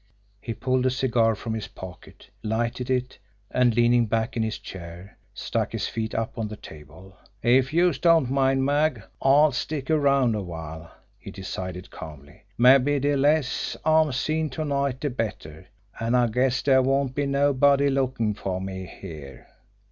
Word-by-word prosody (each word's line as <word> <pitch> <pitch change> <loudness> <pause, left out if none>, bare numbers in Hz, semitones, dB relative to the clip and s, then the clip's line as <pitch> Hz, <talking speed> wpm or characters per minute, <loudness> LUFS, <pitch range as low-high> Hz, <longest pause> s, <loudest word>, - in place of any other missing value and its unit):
He 115 - -5
pulled 130 0 0
a - - +4
cigar 120 -4 +1
from 110 +2 -5
his 110 -1 -4
pocket, 95 -1 -12
lighted 115 +3 -2
it, 125 -2 -1 0.3
and, 125 -3 +2
leaning 120 0 +3
back 110 +1 -1
in 115 - 0
his 110 0 -2
chair, 90 +1 -10 0.2
stuck - - -3
his - - -2
feet 110 -1 -4
up 115 +1 -3
on 110 - -1
the 105 - -7
table. 80 +3 -14 0.3
"If 130 +3 +3
youse 170 -3 +2
don't 165 -5 +4
mind, 135 -1 +2
Mag, 145 -5 +1 0.2
I'll 145 +3 +5
stick 140 +3 -3
around 140 -5 +3
a 105 - -2
while," 80 -2 -8 0.3
he - - -10
decided 90 -1 -6
calmly. 75 -2 -11 0.2
"Mabbe 135 +3 +5
de 145 +1 +1
less 145 0 +1
I'm 155 -1 +4
seen 155 +4 -1
to 155 - -1
night 140 -2 -1
de 145 - -1
better 105 -10 -5 0.3
an' 115 +2 0
I 125 -1 +4
guess 125 +3 +1
dere 135 -2 +4
won't 135 0 +1
be 145 +1 -1
nobody 140 0 +3
lookin' 130 -5 0
fer 95 -3 -4
me 95 -1 -6
here." 75 -8 -11
125 Hz, 165 wpm, -25 LUFS, 105-140 Hz, 0.3 s, I'll